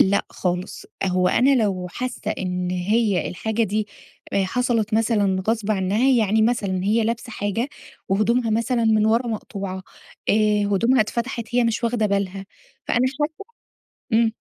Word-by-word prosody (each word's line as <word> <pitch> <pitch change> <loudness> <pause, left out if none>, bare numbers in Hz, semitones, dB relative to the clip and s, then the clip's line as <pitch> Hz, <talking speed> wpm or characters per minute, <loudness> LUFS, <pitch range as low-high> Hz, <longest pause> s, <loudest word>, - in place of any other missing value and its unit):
لأ 200 +1 +4
خالص، 180 0 -3 0.2
أ - - +1
هو 180 0 +2
أنا 255 +1 +4
لو 185 -3 -1
حاسّة 255 -1 -4
إن 180 -1 -2
هي 200 +2 +1
الحاجة 220 +5 -2
دي 210 0 -1 0.4
آآ، 195 -1 +2
حصلت 230 0 0
مثلًا 205 -4 +2
غصب 220 -2 0
عنّها، 205 +6 +2
يعني 220 -3 +3
مثلًا 200 -6 0
هي 220 +2 +2
لابسة 235 +1 -3
حاجة 205 +6 -2 0.4
وهدومها 225 +4 +2
مثلًا 230 +2 +1
من 215 -1 +3
ورا 230 +3 +2
مقطوعة، 195 -4 -5 0.5
آآ، - - +5 0.4
هدومها 230 +6 +3
اتفتحت 235 +2 -2
هي 245 - +4
مش 230 +1 0
واخدة 230 -2 +1
بالها، 195 -1 -2 0.4
فأنا 245 +2 +2
شايفة 300 +7 -3 0.7
إمم. 225 0 +4
220 Hz, 150 wpm, -22 LUFS, 195-235 Hz, 0.7 s, آآ